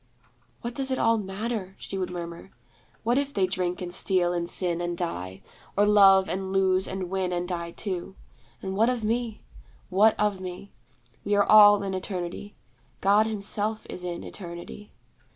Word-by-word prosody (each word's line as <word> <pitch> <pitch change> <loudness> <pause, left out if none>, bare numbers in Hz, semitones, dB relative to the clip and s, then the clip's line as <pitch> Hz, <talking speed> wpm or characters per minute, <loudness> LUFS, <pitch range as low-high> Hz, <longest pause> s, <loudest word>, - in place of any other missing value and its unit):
'What 235 0 -4
does 270 +2 -1
it 260 - 0
all 230 0 +3
matter?' 195 0 -4
she - - -7
would 185 -2 -2
murmur. 170 0 -7 0.5
'What 240 +4 +2
if 280 0 -2
they 195 - +3
drink 180 -1 -2
and 175 0 -6
steal 180 -2 +1
and 170 -1 -2
sin 175 -2 -1
and 175 0 -3
die? 95 - -4 0.3
or 205 - +5
love 195 -2 +6
and 190 0 -3
lose 190 0 +2
and 190 -1 -4
win 190 -1 -1
and 175 0 -2
die 170 -2 -3
too? 185 0 -5 0.5
And 190 0 -3
what 225 +4 +3
of 245 -3 -2
me? 230 0 -2 0.5
What 210 +4 +4
of 210 -2 +1
me? 185 +2 -8 0.5
We 205 - +1
are 205 - +5
all 205 -1 +8
in 195 -1 -3
Eternity. 185 +1 -4 0.4
God 205 +3 +4
Himself 215 0 -1
is 180 - -7
in 175 -1 -4
Eternity.' 175 +2 -8
190 Hz, 170 wpm, -26 LUFS, 180-210 Hz, 0.5 s, all